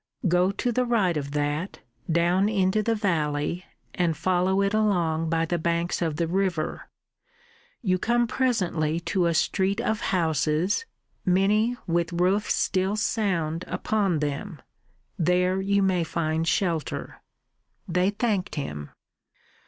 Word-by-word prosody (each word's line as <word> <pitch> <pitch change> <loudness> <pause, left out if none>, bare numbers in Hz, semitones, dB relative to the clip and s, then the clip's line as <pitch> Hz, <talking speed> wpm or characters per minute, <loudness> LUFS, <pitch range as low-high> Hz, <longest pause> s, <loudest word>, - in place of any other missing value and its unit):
Go 180 +1 +3
to 245 +4 -1
the 250 +2 +1
right 220 -8 +1
of 140 -2 -3
that, 150 +5 -2 0.3
down 175 +4 +3
into 195 0 +2
the 225 +2 0
valley 170 -4 -1 0.3
and 170 -3 0
follow 185 +3 +1
it 200 +1 0
along 170 -7 +1
by 165 0 +1
the 175 +1 -1
banks 170 +2 -1
of 160 -3 0
the 170 +2 0
river. 175 -2 -2 0.9
You 185 -3 +1
come 240 +3 +2
presently 185 - 0
to 180 0 0
a 170 - 0
street 190 +5 +1
of 220 -3 0
houses, 165 - 0 0.4
many 210 +6 +2
with 170 0 +1
the 170 - -7
roofs 185 +4 +2
still 190 +1 0
sound 185 -7 -1
upon 200 -6 0
them. 150 +4 -3 0.6
There 180 +2 +2
you 200 +1 +2
may 185 -3 +2
find 160 0 -1
shelter." 165 -4 -1 0.7
They 180 +2 +2
thanked 205 -2 -1
him. 75 - -5
180 Hz, 135 wpm, -26 LUFS, 165-200 Hz, 0.9 s, Go